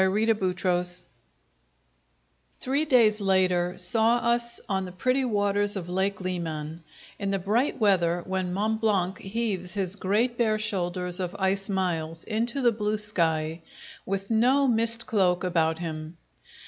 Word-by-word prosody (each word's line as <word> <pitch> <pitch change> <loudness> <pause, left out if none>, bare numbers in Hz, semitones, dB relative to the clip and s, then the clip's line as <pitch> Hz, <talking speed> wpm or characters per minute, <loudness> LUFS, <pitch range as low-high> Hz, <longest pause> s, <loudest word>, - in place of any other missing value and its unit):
Chapter 210 +4 +3 0.2
Five 180 -1 0 1.7
Three 280 +4 0
days 225 -7 +4
later 185 -2 +2
saw 225 +6 +2
us 235 0 -1
on 190 -3 -1
the 180 - -7
pretty 255 +9 +1
waters 205 -3 0
of 175 -3 -5
Lake 190 +2 0
Leman, 165 -3 -4 0.4
in 200 - -2
the 195 - +1
bright 215 +10 0
weather 175 -5 +3
when 185 -1 -2
Mont 215 +4 -1
Blanc 195 -4 +1
heaves 195 -4 -3
his 195 -1 -2
great 220 +6 0
bare 220 -2 +3
shoulders 180 -3 -3
of 180 +1 -3
ice 195 0 0
miles 165 -4 -2
into 235 +4 -2
the 240 - +5
blue 210 -1 -1
sky, 165 -6 -1 0.4
with 195 +2 -3
no 255 +5 +4
mist 230 -1 0
cloak 185 -5 +2
about 165 -3 +1
him. 160 -1 -6
195 Hz, 140 wpm, -27 LUFS, 180-220 Hz, 1.7 s, the